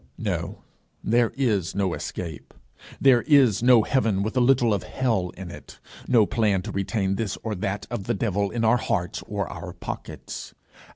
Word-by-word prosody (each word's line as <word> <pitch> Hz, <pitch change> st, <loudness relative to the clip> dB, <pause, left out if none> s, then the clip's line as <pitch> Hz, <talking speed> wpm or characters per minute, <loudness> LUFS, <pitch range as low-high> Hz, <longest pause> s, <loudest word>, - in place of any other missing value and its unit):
No, -, -, -3 dB, 0.4 s
there 115 Hz, +1 st, +2 dB
is 105 Hz, -11 st, 0 dB
no 95 Hz, -3 st, 0 dB
escape. 80 Hz, -5 st, -6 dB, 0.4 s
There 130 Hz, -3 st, +5 dB
is 135 Hz, -10 st, +4 dB
no 120 Hz, -2 st, +6 dB
heaven 110 Hz, -7 st, +1 dB
with 110 Hz, +5 st, -3 dB
a -, -, +3 dB
little 120 Hz, -3 st, +4 dB
of 100 Hz, -, 0 dB
hell 115 Hz, -9 st, -1 dB
in 90 Hz, -2 st, -7 dB
it -, -, -12 dB, 0.3 s
no 115 Hz, -4 st, +5 dB
plan 100 Hz, -4 st, +1 dB
to -, -, -5 dB
retain 100 Hz, -1 st, -1 dB
this 110 Hz, -3 st, -2 dB
or 110 Hz, -, -2 dB
that 100 Hz, +1 st, -3 dB
of 95 Hz, -, -4 dB
the 120 Hz, -, 0 dB
devil 100 Hz, -1 st, 0 dB
in 115 Hz, +1 st, -1 dB
our 115 Hz, +3 st, +5 dB
hearts 90 Hz, -6 st, -2 dB
or -, -, -2 dB
our -, -, -7 dB
pockets. -, -, -7 dB
110 Hz, 175 wpm, -25 LUFS, 95-120 Hz, 0.4 s, no